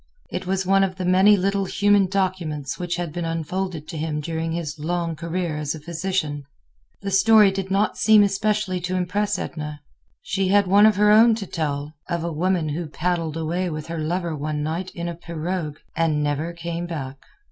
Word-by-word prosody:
It 185 Hz, -, -4 dB
was 190 Hz, 0 st, 0 dB
one 195 Hz, +1 st, +4 dB
of 190 Hz, -1 st, -1 dB
the 185 Hz, -1 st, -4 dB
many 190 Hz, +3 st, +6 dB
little 195 Hz, +1 st, 0 dB
human 205 Hz, 0 st, +3 dB
documents 180 Hz, -7 st, -2 dB
which 175 Hz, -1 st, -2 dB
had 175 Hz, -3 st, -4 dB
been 175 Hz, 0 st, -3 dB
unfolded 165 Hz, 0 st, -3 dB
to 160 Hz, -, -5 dB
him 155 Hz, -1 st, -2 dB
during 160 Hz, +1 st, -3 dB
his 160 Hz, -2 st, -4 dB
long 170 Hz, +1 st, -2 dB
career 170 Hz, 0 st, -3 dB
as 150 Hz, 0 st, -2 dB
a -, -, -8 dB
physician. 165 Hz, -2 st, -2 dB, 0.6 s
The 195 Hz, -, -2 dB
story 210 Hz, +1 st, +6 dB
did 190 Hz, 0 st, -4 dB
not 195 Hz, +2 st, +1 dB
seem 215 Hz, -1 st, +6 dB
especially 200 Hz, -1 st, 0 dB
to 180 Hz, +2 st, -2 dB
impress 185 Hz, +3 st, 0 dB
Edna. 150 Hz, -2 st, -5 dB, 0.4 s
She 195 Hz, -1 st, -1 dB
had 200 Hz, +1 st, +4 dB
one 200 Hz, +3 st, +6 dB
of 215 Hz, -, +3 dB
her 210 Hz, +1 st, +4 dB
own 225 Hz, +2 st, +7 dB
to 215 Hz, -3 st, -5 dB
tell, 150 Hz, -4 st, -3 dB, 0.2 s
of 170 Hz, -1 st, -1 dB
a 170 Hz, -1 st, -3 dB
woman 170 Hz, 0 st, 0 dB
who 160 Hz, +3 st, -3 dB
paddled 165 Hz, 0 st, -2 dB
away 170 Hz, +3 st, -1 dB
with 155 Hz, -2 st, -5 dB
her 165 Hz, -1 st, -3 dB
lover 170 Hz, +1 st, -2 dB
one 150 Hz, 0 st, -3 dB
night 165 Hz, +5 st, -3 dB
in 170 Hz, 0 st, -4 dB
a 170 Hz, -, -3 dB
pirogue 165 Hz, -1 st, -4 dB, 0.2 s
and 155 Hz, -3 st, +1 dB
never 145 Hz, +3 st, -1 dB
came 170 Hz, 0 st, -5 dB
back. 135 Hz, -5 st, -5 dB
175 Hz, 195 wpm, -23 LUFS, 155-190 Hz, 0.6 s, own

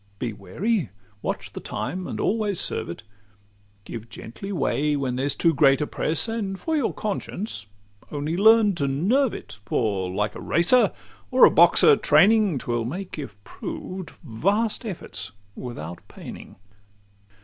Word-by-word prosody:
Be 115 Hz, +1 st, -3 dB
wary, 150 Hz, -, -2 dB, 0.3 s
watch -, -, -4 dB
the -, -, -5 dB
time, 185 Hz, +1 st, -4 dB
and -, -, -5 dB
always 210 Hz, -3 st, 0 dB
serve -, -, -1 dB
it; 85 Hz, -, -7 dB, 0.8 s
Give 115 Hz, 0 st, -8 dB
gently 195 Hz, -, -8 dB
way, 150 Hz, -3 st, 0 dB
when 135 Hz, -3 st, -1 dB
there's 135 Hz, +2 st, 0 dB
too 165 Hz, -1 st, +3 dB
great 140 Hz, -2 st, +4 dB
a 150 Hz, -, 0 dB
press; 155 Hz, +5 st, -1 dB
And 205 Hz, -4 st, -3 dB
for 320 Hz, -, -1 dB
your 285 Hz, -6 st, +1 dB
conscience, 200 Hz, -, -4 dB, 0.4 s
only 150 Hz, +2 st, -2 dB
learn 215 Hz, +1 st, +6 dB
to 140 Hz, -, 0 dB
nerve 210 Hz, -, +2 dB
it, -, -, -10 dB
For, 100 Hz, -5 st, -1 dB
like 105 Hz, +3 st, -1 dB
a -, -, -8 dB
racer, 180 Hz, +10 st, +4 dB, 0.4 s
or -, -, +7 dB
a -, -, +6 dB
boxer 450 Hz, -, +6 dB
training, 195 Hz, -, +4 dB
'T -, -, -7 dB
will 120 Hz, -1 st, 0 dB
make, 175 Hz, +8 st, -5 dB
if 135 Hz, -9 st, -7 dB
proved, 185 Hz, -, -7 dB
vast 200 Hz, -, 0 dB
efforts 180 Hz, -, -6 dB, 0.2 s
without 85 Hz, -9 st, -7 dB
paining. -, -, -10 dB
160 Hz, 150 wpm, -24 LUFS, -, 0.8 s, or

